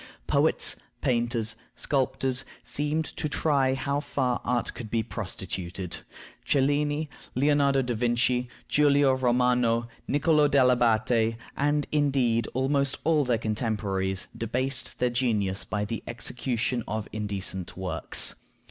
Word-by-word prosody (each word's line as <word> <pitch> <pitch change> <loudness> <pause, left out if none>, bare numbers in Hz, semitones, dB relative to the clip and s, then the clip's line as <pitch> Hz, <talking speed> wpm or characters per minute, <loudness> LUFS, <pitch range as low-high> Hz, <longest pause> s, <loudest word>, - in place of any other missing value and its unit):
Poets, - - +2 0.2
painters, 115 -2 0 0.2
sculptors, 135 -1 0 0.2
seemed 150 +6 -1
to 150 - -4
try 140 -4 +2
how 140 +1 -1
far 130 -4 -1
art 125 -1 0
could 115 -3 -7
be 115 0 0
prostituted. 95 -5 -5 0.5
Cellini, 145 +2 +1 0.3
Leonardo 140 0 +3
da 125 -1 -1
Vinci, 120 +1 +1 0.2
Giulio 145 -2 +4
Romano, 125 -2 +2 0.2
Nicollo 150 +1 +3
dell' 135 -3 +5
Abate, 115 -1 +2 0.2
and, 145 +1 +1
indeed, 135 -6 +2
almost 135 +1 +1
all 155 -1 +3
their 125 -3 +1
contemporaries, 105 -4 -1
debased 130 +3 -1
their 125 -1 +1
genius 105 -6 0
by 105 -1 -2
the 110 +2 -4
execution 120 0 -2
of 110 0 -3
indecent 100 -4 -4
works. 90 -4 0
125 Hz, 115 wpm, -27 LUFS, 110-140 Hz, 0.5 s, dell